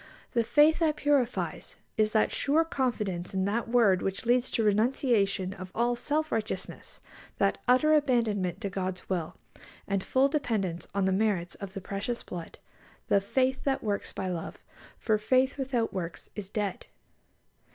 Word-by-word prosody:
The 235 - +2
faith 295 +7 +4
that 315 -3 +2
purifies 285 -5 0 0.2
is 215 -1 +2
that 215 - +3
sure 310 +4 +2
confidence 210 - -2
in 190 0 +1
that 225 +4 -1
word 225 -6 +4
which 195 +3 -3
leads 245 +1 +3
to 225 - 0
renunciation 210 -3 +2
of 185 -1 -9
all 240 +2 +2
self 305 +5 -1
righteousness, 225 0 -4 0.4
that - - +1
utter 255 +5 +5
abandonment 225 - +1
to 200 - -2
God's 185 -1 -4
will, 175 -4 -2 0.5
and 195 -1 0
full 265 +1 +3
dependence 215 - -2
on 200 -1 +2
the 190 - +2
merits 190 -3 0
of 200 -2 -8
"the 195 - -6
precious 200 +5 -4
blood," 170 -2 -8 0.5
the 200 - +4
"faith 260 +5 0
that 270 -1 0
works 205 -2 -2
by 190 - -4
love," 175 -3 -4 0.4
for 215 -2 +1
"faith 255 +6 +2
without 255 -4 -1
works 170 -3 -5
is 200 -3 -6
dead." 205 -2 -3
215 Hz, 160 wpm, -29 LUFS, 190-255 Hz, 0.5 s, utter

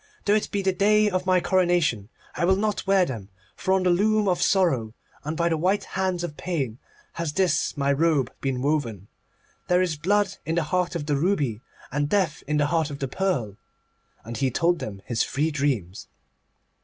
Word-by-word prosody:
Though 205 - +3
it 215 - +1
be 200 -1 -2
the 190 0 +2
day 210 +2 +3
of 185 0 -2
my 185 -1 +4
coronation, 175 - +1 0.2
I 170 - -3
will 190 +2 +4
not 210 0 -1
wear 195 -2 +4
them. 110 - -6 0.3
For 190 - -2
on 190 -1 +3
the 180 - +3
loom 210 +3 +2
of 180 -2 +1
Sorrow, 135 - +2 0.3
and 155 +2 -4
by 170 - +2
the 165 -2 0
white 195 +4 +1
hands 185 -2 -2
of 160 -4 -5
Pain, 135 -11 -3 0.4
has 160 -3 -2
this 185 -2 +1
my 140 0 +2
robe 145 -4 +1
been 130 -2 -2
woven. 120 - -1 0.6
There 180 0 +3
is 180 -4 0
Blood 200 +5 +1
in 160 - -2
the 170 - +1
heart 180 +3 -1
of 155 -4 -3
the 145 -2 0
ruby, 145 - 0 0.3
and 145 +2 -1
Death 185 -6 +1
in 150 0 +1
the 145 - +3
heart 160 0 0
of 140 - -6
the 135 - -3
pearl.' 130 - -2 0.7
And 115 0 -6
he 135 +3 +1
told 170 +6 +1
them 100 -7 -7
his 120 -2 -1
three 150 +4 -1
dreams. 130 - -2
165 Hz, 200 wpm, -25 LUFS, 140-185 Hz, 0.7 s, my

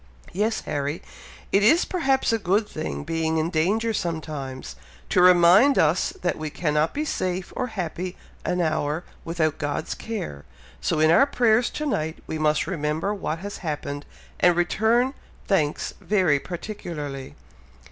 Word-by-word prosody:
"Yes, 215 +4 0
Harry! 145 +3 -3 0.5
It 195 - +4
is 305 - +5
perhaps 270 -9 +1
a 225 - +1
good 205 +2 +1
thing 155 -6 -5
being 160 +1 -1
in 160 +2 0
danger 210 +8 +1
sometimes, 155 -7 -4 0.3
to 180 - +3
remind 180 +9 +7
us 160 +3 +3
that 175 - 0
we 155 -1 -3
cannot 150 0 0
be 300 +2 -1
safe 185 -9 -2
or 255 - -1
happy 180 -3 -4 0.3
an 180 - 0
hour 155 0 0 0.2
without 160 -2 -1
God's 145 -1 -2
care, 190 - -5 0.4
so 155 - 0
in 155 +1 +5
our 275 +11 +6
prayers 240 -3 +3
to 305 - -4
night 160 - -1
we 160 - -4
must 155 0 +2
remember 160 +3 -1
what 180 -5 -3
has 205 - -5
happened, 145 -3 -4 0.3
and 175 -1 +5
return 220 +9 +2 0.3
thanks 155 -7 0
very 180 -9 +2
particularly." 150 -7 -6
175 Hz, 145 wpm, -24 LUFS, 155-210 Hz, 0.5 s, remind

